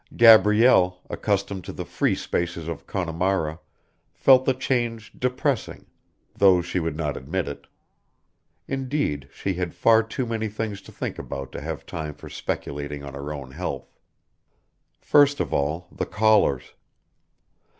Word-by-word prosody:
Gabrielle, 105 -4 +6
accustomed 100 -2 -1
to - - -7
the - - -6
free - - 0
spaces 85 -2 -3
of 85 -3 -6
Connemara, 85 -2 -1 0.6
felt 130 -1 +5
the 130 - +3
change 120 -4 -2
depressing, 125 +1 -2 0.5
though 95 -3 +5
she 85 +1 -2
would 80 -3 -3
not 75 -4 -2
admit 80 +8 -3
it; 70 - -8 1.0
indeed, 135 - -2
she 100 - -3
had 90 -1 -4
far 115 -1 +5
too 115 +3 -4
many 110 -1 -2
things 105 -1 -4
to - - -14
think - - -5
about 70 0 -6
to - - -7
have - - -5
time 75 -3 -5
for - - -11
speculating 70 0 -4
on 70 -1 -8
her 70 +2 -6
own 70 -3 -7
health. 70 -4 -5 1.1
First 145 -1 +4
of - - -2
all 75 +5 -1
the - - -4
callers. 105 - +2
95 Hz, 140 wpm, -24 LUFS, 75-115 Hz, 1.1 s, Gabrielle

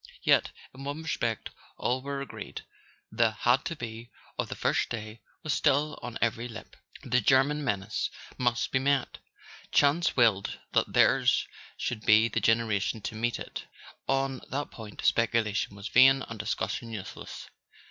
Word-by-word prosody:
Yet - - +4 0.2
in 135 +1 -10
one 145 +3 -4
respect 115 -7 -2 0.3
all 125 +2 0
were 140 0 -4
agreed: - - -8 0.5
the 115 -1 +3
"had 120 +4 +2
to 165 - -3
be" 115 -3 -7 0.3
of - - -2
the - - -4
first - - +1
day 110 -1 -6 0.2
was 155 -2 0
still 145 +1 +2
on 120 -1 -5
every 115 +1 0
lip. 115 -2 -10 0.3
The 125 0 +2
German 135 +5 +3
menace 100 -6 -1 0.3
must 120 -1 0
be 130 - +2
met: 140 -1 0 0.5
chance 145 +4 +3
willed 110 -5 +3
that - - +1
theirs - - +4 0.3
should 110 -3 -3
be 110 +1 +6
the - - 0
generation 115 -2 +1
to 110 - -5
meet 120 +2 0
it; - - -7 0.4
on 135 -1 0
that 145 +3 -3
point 110 -3 -9
speculation 110 -3 +1
was 100 +1 -6
vain 135 +2 +6
and 115 -2 -8
discussion 110 +1 -2
useless. 110 -4 -7
120 Hz, 155 wpm, -29 LUFS, 110-135 Hz, 0.5 s, be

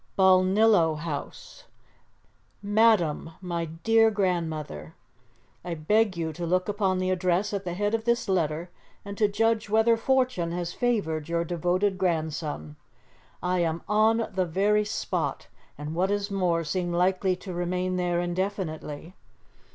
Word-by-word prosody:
"BALNILLO 190 -2 +4
HOUSE. 150 -2 -7 1.0
"MADAM, 205 -7 +2
MY 170 -2 -3
DEAR 225 +8 +3
GRANDMOTHER, 160 - -2 0.7
"I 175 -1 -4
beg 205 +5 +1
you 160 -1 -2
to 175 - -6
look 180 +2 0
upon 200 -3 0
the 185 0 0
address 185 +2 0
at 200 -1 -3
the 175 -1 -3
head 205 +3 -1
of 225 0 -1
this 235 0 +1
letter, 170 -2 -1 0.3
and 200 0 -6
to 210 - +4
judge 220 +1 0
whether 220 +2 +4
fortune 250 -8 0
has 175 0 -3
favoured 165 -11 -1
your 170 0 0
devoted 180 +3 0
grandson. 155 - -2 0.7
"I 180 0 +1
am 165 -1 -1
on 220 +2 +3
the 185 -1 0
very 205 +5 +2
spot, 205 - -3 0.3
and, 150 +2 -5
what 180 +3 +1
is 205 0 -1
more, 180 -4 +1
seem 175 +2 -2
like 180 +2 +1 0.2
to 185 -1 -7
remain 180 +1 -1
there 175 -1 0
indefinitely. 175 -3 -4
185 Hz, 140 wpm, -26 LUFS, 170-205 Hz, 1.0 s, BALNILLO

